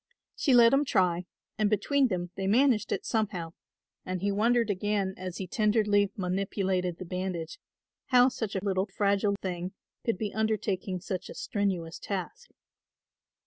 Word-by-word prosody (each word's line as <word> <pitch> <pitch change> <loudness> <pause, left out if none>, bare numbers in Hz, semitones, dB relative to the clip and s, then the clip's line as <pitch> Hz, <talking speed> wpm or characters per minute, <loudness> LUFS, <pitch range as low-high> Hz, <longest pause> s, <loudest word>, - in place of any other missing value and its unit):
She 270 -5 +3
let 235 0 +7
him 275 +2 +4
try 180 -8 +1 0.3
and 210 -1 +3
between 265 +7 +2
them 175 -4 -3
they 190 0 -2
managed 235 0 +3
it - - -2
somehow, 190 -7 -1 0.5
and 185 0 -3
he 200 +2 0
wondered 230 +2 +2
again 200 0 -1
as 185 -1 -6
he 190 - -4
tenderly 210 0 +2
manipulated 185 -1 -1
the 185 - -7
bandage, 180 - -4 0.5
how 250 -2 +6
such 220 -5 -4
a 190 +1 -2
little 190 0 +1
fragile 200 +1 +1
thing 180 0 -3 0.3
could 230 -5 0
be 210 0 -3
undertaking 200 -4 -1
such 185 -2 -4
a - - -8
strenuous 185 -5 -2
task. 190 -3 -5
200 Hz, 150 wpm, -29 LUFS, 185-215 Hz, 0.5 s, let